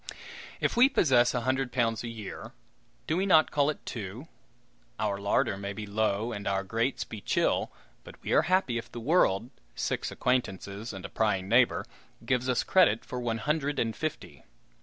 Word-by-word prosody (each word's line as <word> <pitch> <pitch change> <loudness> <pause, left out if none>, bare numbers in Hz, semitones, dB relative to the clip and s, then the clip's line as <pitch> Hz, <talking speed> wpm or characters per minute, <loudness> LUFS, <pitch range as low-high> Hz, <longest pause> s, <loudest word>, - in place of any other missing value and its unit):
If - - 0
we 250 +3 +6
possess 130 - +3
a 120 - 0
hundred 130 +1 0
pounds 115 -3 0
a - - -4
year, 110 -4 -8 0.5
do 155 - 0
we 190 +3 0
not 160 -4 +5
call 145 0 +2
it 155 - -5
two? 110 - -6 0.7
Our 100 -2 -1
larder 100 -1 +1
may 100 0 -5
be 105 +1 -6
low 105 +2 0
and 105 -2 -5
our 95 0 0
grates 115 +5 -1
be 110 -1 -9
chill, - - +1 0.3
but - - -13
we - - -4
are - - +6
happy 185 -11 +2
if 120 - -11
the 120 - -6
"world" 120 - +2 0.2
(six - - -2
acquaintances 110 -3 -2
and 95 -2 -8
a - - -6
prying 100 -4 0
neighbor) 115 -2 +3 0.4
gives 125 +1 0
us 125 - +2
credit 115 - +3
for 125 - -5
one 120 -2 -1
hundred 145 +4 -1
and 115 -1 0
fifty. 155 -1 -5
115 Hz, 180 wpm, -29 LUFS, 105-130 Hz, 0.7 s, we